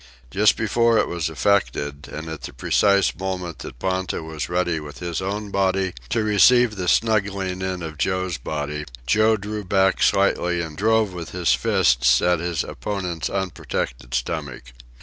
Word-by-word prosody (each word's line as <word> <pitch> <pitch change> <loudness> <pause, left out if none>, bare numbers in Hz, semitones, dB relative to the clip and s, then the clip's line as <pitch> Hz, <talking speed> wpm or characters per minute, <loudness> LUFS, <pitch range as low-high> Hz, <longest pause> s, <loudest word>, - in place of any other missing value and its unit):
Just 105 +5 +4
before 115 +1 +2
it - - +2
was 85 -2 -2
effected, 75 -5 0
and 80 +1 -6
at 80 -1 -6
the - - -8
precise 100 +9 +2
moment 90 -3 -4
that - - -9
Ponta 95 +3 -2
was 80 -1 -5
ready 85 -2 0
with 75 -1 -9
his 85 -1 -4
own 100 +2 -4
body 95 -1 +1 0.2
to 115 0 +1
receive 110 +2 +5
the 90 -2 -4
snuggling 100 -3 +1
in 95 -2 -3
of 80 -2 -7
Joe's 95 -3 -1
body, 75 +2 -4 0.2
Joe 110 - +3
drew 105 +1 -5
back 95 0 +2
slightly 90 -3 +2
and 80 -2 -5
drove 110 +1 +2
with 85 -2 -7
his 90 -7 +2
fists - - +3
at 90 -1 +2
his 85 -2 -1
opponent's 90 -5 -4
unprotected 65 -9 -3
stomach. 65 -1 -4
90 Hz, 160 wpm, -22 LUFS, 80-100 Hz, 0.2 s, receive